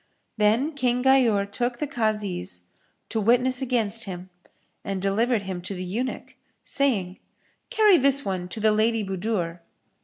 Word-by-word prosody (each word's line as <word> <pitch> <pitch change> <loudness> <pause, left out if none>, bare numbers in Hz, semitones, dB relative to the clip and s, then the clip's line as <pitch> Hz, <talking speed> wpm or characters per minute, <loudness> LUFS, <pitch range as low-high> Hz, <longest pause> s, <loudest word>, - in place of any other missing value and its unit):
Then 220 +8 +2
King 250 -3 0
Ghayur 245 -7 +4
took 240 +2 -2
the 300 - -2
Kazis 210 - -2 0.5
to 225 - -1
witness 250 +4 +2
against 230 -4 -1
him 185 -1 -8 0.5
and 195 -1 -3
delivered 210 +4 +1
him 190 -2 -5
to 190 +3 -5
the 180 - -5
eunuch, 230 +8 -4 0.3
saying, 205 -10 0 0.5
"Carry 430 -6 +5
this 275 0 +3
one 185 -2 -3
to 220 - -5
the 215 0 +3
Lady 220 +1 +1
Budur." 190 -3 -2
220 Hz, 145 wpm, -25 LUFS, 195-255 Hz, 0.5 s, Carry